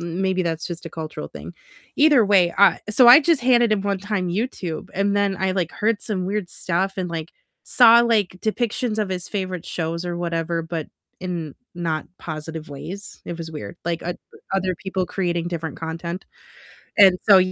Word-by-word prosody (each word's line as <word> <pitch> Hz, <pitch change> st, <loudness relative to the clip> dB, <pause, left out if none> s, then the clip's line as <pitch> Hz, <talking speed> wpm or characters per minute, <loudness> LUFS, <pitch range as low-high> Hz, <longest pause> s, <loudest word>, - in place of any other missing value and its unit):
m 170 Hz, +1 st, -4 dB
maybe 190 Hz, -1 st, +1 dB
that's 165 Hz, -2 st, -2 dB
just 175 Hz, -1 st, -7 dB
a -, -, -7 dB
cultural 155 Hz, -1 st, -6 dB
thing, -, -, -9 dB, 0.4 s
either 290 Hz, -5 st, +6 dB
way, 190 Hz, -4 st, +4 dB
I 200 Hz, -, +6 dB
So 245 Hz, +4 st, +6 dB
I 245 Hz, +5 st, +10 dB
just 325 Hz, -4 st, +2 dB
handed 240 Hz, -2 st, +4 dB
him 205 Hz, -2 st, +1 dB
one 200 Hz, -1 st, -1 dB
time 195 Hz, -2 st, -2 dB
YouTube, 180 Hz, -4 st, -3 dB
and 200 Hz, +1 st, +1 dB
then 200 Hz, -1 st, +1 dB
I, 190 Hz, 0 st, 0 dB
like, 180 Hz, -3 st, -1 dB
heard 215 Hz, 0 st, 0 dB
some 185 Hz, -5 st, -3 dB
weird 200 Hz, -2 st, -2 dB
stuff 185 Hz, +2 st, -1 dB
and, 185 Hz, -2 st, -2 dB
like, 165 Hz, -1 st, -5 dB, 0.3 s
saw, 235 Hz, -1 st, +7 dB
like, 215 Hz, -6 st, +1 dB
depictions 220 Hz, 0 st, -1 dB
of 210 Hz, -2 st, 0 dB
his 180 Hz, -2 st, -4 dB
favorite 185 Hz, -4 st, -4 dB
shows 165 Hz, +1 st, -3 dB
or 175 Hz, -1 st, -3 dB
whatever, 170 Hz, -1 st, -2 dB
but 165 Hz, -1 st, -5 dB, 0.3 s
in 175 Hz, -5 st, -4 dB, 0.2 s
not 165 Hz, -3 st, -2 dB
positive 155 Hz, 0 st, -7 dB
ways, 180 Hz, +8 st, -8 dB
it 170 Hz, -, -6 dB
was 165 Hz, -1 st, -6 dB
weird, 155 Hz, +2 st, -7 dB
like, 170 Hz, 0 st, -2 dB
oth 175 Hz, +1 st, -3 dB, 0.4 s
other 190 Hz, -1 st, 0 dB
people 190 Hz, +1 st, -2 dB
creating 175 Hz, -3 st, -2 dB
different 165 Hz, -3 st, -4 dB
content, 170 Hz, +2 st, -5 dB, 0.7 s
and 190 Hz, -3 st, +7 dB
so, 200 Hz, -2 st, +9 dB
185 Hz, 185 wpm, -22 LUFS, 170-205 Hz, 0.7 s, I